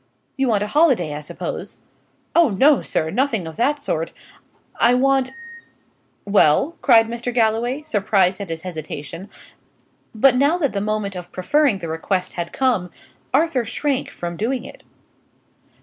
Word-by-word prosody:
"You 270 -1 0
want 210 -4 +2
a - - -3
holiday, 260 - +3
I 145 - -5
suppose?" 150 - -6 0.6
"Oh 340 -4 +5
no, 270 +8 +4
sir; 160 0 -2
nothing 225 -4 0
of 160 -1 -8
that 290 +5 +1
sort. 165 - -2 0.7
I 240 +2 +5
want 270 0 +2 0.5
" - - -41
"Well?" 265 - +3
cried 225 -4 +5
Mr. 235 +1 -4
Galloway, 240 +4 0
surprised 200 -7 +1
at 200 - -6
his 165 0 -5
hesitation; 165 +1 -7 0.9
but 250 +4 +5
now 285 +6 +3
that 290 -7 -1
the 200 - -1
moment 210 -2 -2
of 180 -1 -8
preferring 275 +5 +2
the 175 -3 -6
request 180 +3 -2
had 170 -1 -4
come, 235 -9 0 0.4
Arthur 280 -2 +2
shrank 270 +4 -2
from 170 -1 -6
doing 240 +3 -2
it. - - -12
225 Hz, 150 wpm, -21 LUFS, 180-270 Hz, 0.9 s, Oh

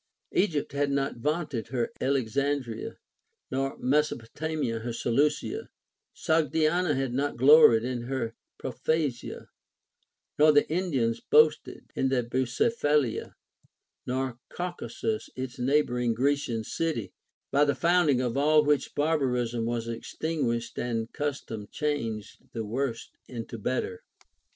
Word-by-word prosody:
Egypt 165 -7 +1
had 140 0 0
not 140 -1 -1
vaunted 150 -3 -2
her 120 -1 -1
Alexandria, 135 -2 -1 0.5
nor 135 +1 -1
Mesopotamia 145 -1 -1
her 120 +1 -4
Seleucia; 150 - 0 0.5
Sogdiana 160 +1 +2
had 135 -2 -1
not 140 +1 -1
gloried 130 -4 +7
in 125 -1 -2
her 120 -3 -2 0.2
Propthasia, 135 0 -2 0.9
nor 155 0 +7
the 145 - +4
Indians 135 -10 0
boasted 155 +1 +3
their 130 -2 +1
Bucephalia, 130 - 0 0.7
nor 130 -1 -2
Caucasus 180 +5 -4
its 130 0 -5
neighboring 125 -3 +1
Grecian 130 -3 0
city; 120 - -2 0.4
by 140 +1 +4
the 145 -1 +2
founding 170 -7 +3
of 125 -2 -1
all 150 +2 +4
which 145 -2 +1
bar 155 +2 +2
barism 120 -3 0
was 115 0 -2
extinguished 120 0 -2
and 115 -2 -2
custom 135 -8 -4
changed 115 -9 -3
the 115 -2 -3
worse 115 +1 -3 0.2
into 115 -2 -6
better. 100 -5 -2
135 Hz, 110 wpm, -28 LUFS, 120-150 Hz, 0.9 s, gloried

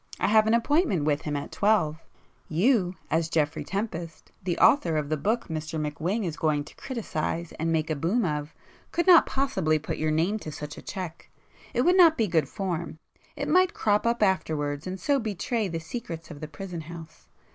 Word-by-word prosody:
I - - +1
have 215 0 +5
an 225 - +4
appointment 235 - +2
with 145 0 +1
him 150 -1 -3
at 140 - -4
twelve. 180 -7 +2 0.5
You, 185 - +2 0.2
as 165 +1 +1
Geoffrey 155 -1 0
Tempest, 175 -3 -5
the 175 -2 -1
author 170 - +4
of 150 -2 -2
the 155 - +1
book 215 +11 -1
Mr 160 -1 -4
McWhing 160 +8 -2
is 160 -3 -4
going 150 -2 +1
to 145 - -15
criticise 170 - -3
and 165 +1 0
make 160 -1 0
a - - +1
'boom' 185 - +1
of, 150 -2 -2 0.4
could 345 - 0
not 355 -3 +7
possibly 265 - +1
put 155 - -5
your 155 - +1
name 170 +8 +1
to 155 - -7
such 150 0 -7
a - - -10
cheque. 180 -4 -7 0.5
It 245 - +3
would 360 +3 +4
not 335 -3 +7
be 225 - +2
'good 160 -8 +1
form'—it 170 -4 -6
might 370 0 +3
crop 210 +2 +2
up 235 -2 +2
afterwards 155 -5 0
and 185 +1 -4
so 280 +5 +2
betray 220 0 -2
'the 165 -2 -3
secrets 165 -4 -7
of 145 - -9
the 155 - -6
prison 170 +2 -7
house. 165 0 -11
170 Hz, 195 wpm, -27 LUFS, 155-220 Hz, 0.5 s, not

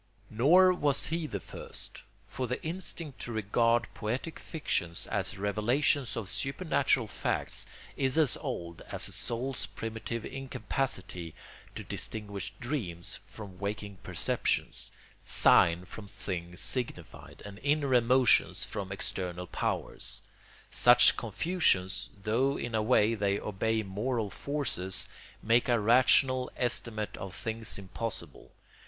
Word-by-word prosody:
Nor 175 +11 +6
was 145 -5 +1
he 165 -1 -1
the 100 - -3
first; - - -9 0.3
for 130 - -3
the 125 - -2
instinct 165 -4 -4
to 120 - -5
regard 115 +2 +2
poetic 125 +9 -3
fictions 85 - -2
as - - -2
revelations 115 +7 +1
of 110 -4 -3
supernatural 140 - +1
facts - - -2 0.3
is 130 +1 0
as 155 -6 +4
old 85 - -5
as - - -3
the - - -4
soul's 125 +3 -1
primitive 115 +1 -5
incapacity 130 - -3 0.4
to - - -5
distinguish 100 -2 -4
dreams 105 - -3
from 100 -4 -10
waking 100 0 -4
perceptions, - - -1 0.3
sign 85 +1 +5
from 100 +2 -9
thing 90 -3 -5
signified, 125 +6 -3
and 100 0 -9
inner 145 0 +1
emotions 125 +1 +4
from 95 -1 -5
external 90 -2 -3
powers. - - -3 0.5
Such 120 0 +7
confusions, 115 - 0
though 130 +6 +2
in 120 - -4
a 110 - +2
way 110 -1 +4
they 100 -2 +1
obey 110 +2 0
moral 105 +2 -2
forces, 120 -10 -1 0.4
make 115 +3 +3
a 120 -1 +4
rational 130 +3 +4
estimate 115 -3 -1
of 95 -2 -6
things 110 +2 -3
impossible. 105 +3 -5
115 Hz, 120 wpm, -30 LUFS, 100-130 Hz, 0.5 s, Such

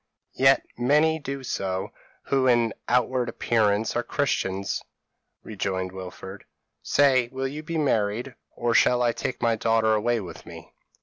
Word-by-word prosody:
p> - - -9
"'Yet 135 0 +5
many 150 +5 +3
do 140 -2 -6
so, 95 -6 -3 0.3
who 135 -1 +1
in 120 -2 +3
outward 125 0 +1
appearance 110 -1 +1
are 120 - +1
Christians,' 100 -7 -1 0.6
rejoined 95 -3 -3
Wilfred; 95 +1 -9 0.4
'say, 130 - +3
will 135 0 -2
you 145 +3 -6
be 165 +1 -4
married, 120 -3 0 0.2
or 120 -1 0
shall 125 +1 +4
I 120 - +3
take 120 +2 -4
my 115 -1 +3
daughter 110 0 +2
away 115 +2 +1
with 95 -4 -9
me?' - - -12
120 Hz, 145 wpm, -25 LUFS, 105-130 Hz, 0.6 s, Yet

